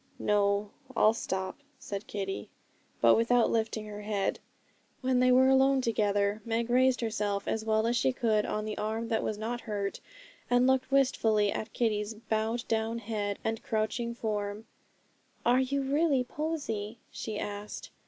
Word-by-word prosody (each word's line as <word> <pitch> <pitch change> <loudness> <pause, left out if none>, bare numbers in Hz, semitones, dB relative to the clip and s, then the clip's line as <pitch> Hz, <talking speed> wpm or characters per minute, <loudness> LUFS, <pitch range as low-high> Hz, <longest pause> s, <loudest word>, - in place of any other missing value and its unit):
'No, 205 0 +1 0.3
I'll 215 - +6
stop,' 190 -3 -3 0.2
said 200 0 -6
Kitty, 195 -1 -4 0.5
but - - +7
without 230 +1 +3
lifting 220 -1 -1
her 210 0 -7
head. 205 -2 -1 0.6
When 255 -1 +2
they 255 0 +5
were 260 +1 +6
alone 265 0 +5
together, 205 -2 +1
Meg 230 +1 -1
raised 255 0 +4
herself 210 -3 -1
as 220 - -1
well 220 0 +2
as 235 +1 +1
she 135 - +2
could 215 - +1
on 215 0 -2
the 215 - -4
arm 220 +2 -2
that 225 -2 +1
was 215 - -2
not 235 +3 -3
hurt, 200 -3 -3 0.5
and 245 0 +4
looked 265 0 +2
wistfully 225 -6 +3
at 215 - -4
Kitty's 215 -2 0
bowed 220 +1 -2
down 225 +1 0
head 205 -3 -3
and 225 0 -2
crouching 235 +2 -1
form. 210 -1 -3 0.8
'Are 245 +2 +5
you 275 +1 0
really 280 -1 +2
Posy?' 245 -7 -3
she 215 -2 -5
asked. 205 0 -6
220 Hz, 155 wpm, -30 LUFS, 210-245 Hz, 0.8 s, but